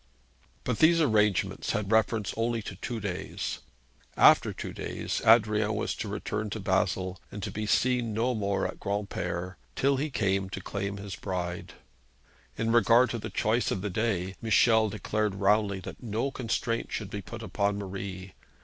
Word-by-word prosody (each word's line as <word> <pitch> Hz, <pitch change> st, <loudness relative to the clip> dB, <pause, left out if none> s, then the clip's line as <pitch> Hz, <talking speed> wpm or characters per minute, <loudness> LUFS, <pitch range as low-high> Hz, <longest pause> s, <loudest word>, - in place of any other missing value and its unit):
But 125 Hz, -, -1 dB
these 165 Hz, +1 st, +6 dB
arrangements 105 Hz, -, +2 dB
had 105 Hz, -1 st, -2 dB
reference 110 Hz, -1 st, +2 dB
only 115 Hz, 0 st, -1 dB
to -, -, -6 dB
two 120 Hz, -3 st, -4 dB
days. 100 Hz, -4 st, -4 dB, 0.6 s
After -, -, +6 dB
two -, -, -6 dB
days, -, -, -3 dB
Adrian 110 Hz, -1 st, +4 dB
was 105 Hz, -, -1 dB
to 110 Hz, -, -4 dB
return 105 Hz, +1 st, -3 dB
to 110 Hz, -, -4 dB
Basle, 95 Hz, -1 st, 0 dB
and 100 Hz, -1 st, -7 dB
to -, -, -3 dB
be 105 Hz, 0 st, -3 dB
seen 120 Hz, +1 st, +2 dB
no 115 Hz, +4 st, +1 dB
more 100 Hz, -3 st, 0 dB
at -, -, -5 dB
Granpere 95 Hz, -3 st, -3 dB, 0.2 s
till 140 Hz, 0 st, +2 dB
he 150 Hz, +3 st, -1 dB
came 100 Hz, -6 st, 0 dB
to -, -, -5 dB
claim 100 Hz, 0 st, -4 dB
his 100 Hz, -1 st, -6 dB
bride. 90 Hz, -2 st, -4 dB, 0.8 s
In 115 Hz, 0 st, 0 dB
regard 115 Hz, +1 st, +5 dB
to 120 Hz, -, -3 dB
the 110 Hz, +1 st, -5 dB
choice 110 Hz, +4 st, +1 dB
of 95 Hz, -, -1 dB
the 105 Hz, -, -2 dB
day, 95 Hz, -3 st, -1 dB
Michel 110 Hz, 0 st, +4 dB
declared 105 Hz, -1 st, -1 dB
roundly 100 Hz, 0 st, +2 dB
that -, -, -9 dB
no 115 Hz, +3 st, -2 dB
constraint 115 Hz, -2 st, -2 dB
should 105 Hz, -3 st, -4 dB
be 100 Hz, -, -4 dB
put 115 Hz, +4 st, -8 dB
upon 100 Hz, -2 st, 0 dB
Marie. 95 Hz, -1 st, -6 dB
105 Hz, 165 wpm, -28 LUFS, 100-115 Hz, 0.8 s, these